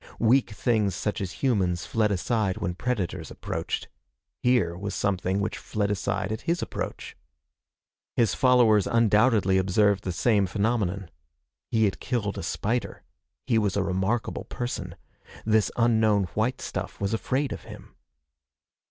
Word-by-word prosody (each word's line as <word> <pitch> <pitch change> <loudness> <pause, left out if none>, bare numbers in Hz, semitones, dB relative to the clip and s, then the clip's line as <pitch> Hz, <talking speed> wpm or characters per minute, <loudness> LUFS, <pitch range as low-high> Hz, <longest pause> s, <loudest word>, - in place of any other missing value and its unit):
Weak 120 +4 +3
things 105 -3 0
such 105 +1 -2
as 95 -2 -3
humans 95 -9 +1
fled 110 -2 +1
aside 100 0 0
when 85 +1 -2
predators 95 -6 -3
approached. - - -4 0.5
Here 120 -9 +2
was 100 +3 -4
something 95 -1 0
which 100 - -2
fled 105 -1 -2
aside 100 -1 -1
at 110 - -3
his 170 0 +1
approach. - - -5 1.0
His 115 -5 +3
followers 120 -6 +4
undoubtedly 110 -4 +3
observed 100 +1 +2
the 95 - -2
same 100 +2 +2
phenomenon. 100 -3 -1 0.6
He 110 -1 +3
had 100 - -1
killed 105 -6 -2
a - - -4
spider. 115 +8 -2 0.4
He 115 - +3
was 100 -2 0
a 100 - +2
remarkable 95 +5 -1
person. 120 0 -5 0.5
This 110 -3 +3
unknown 110 -3 +3
white 120 +4 0
stuff - - -5
was 100 +2 -1
afraid 130 +5 -1
of - - -9
him. - - -12
105 Hz, 140 wpm, -26 LUFS, 95-115 Hz, 1.0 s, followers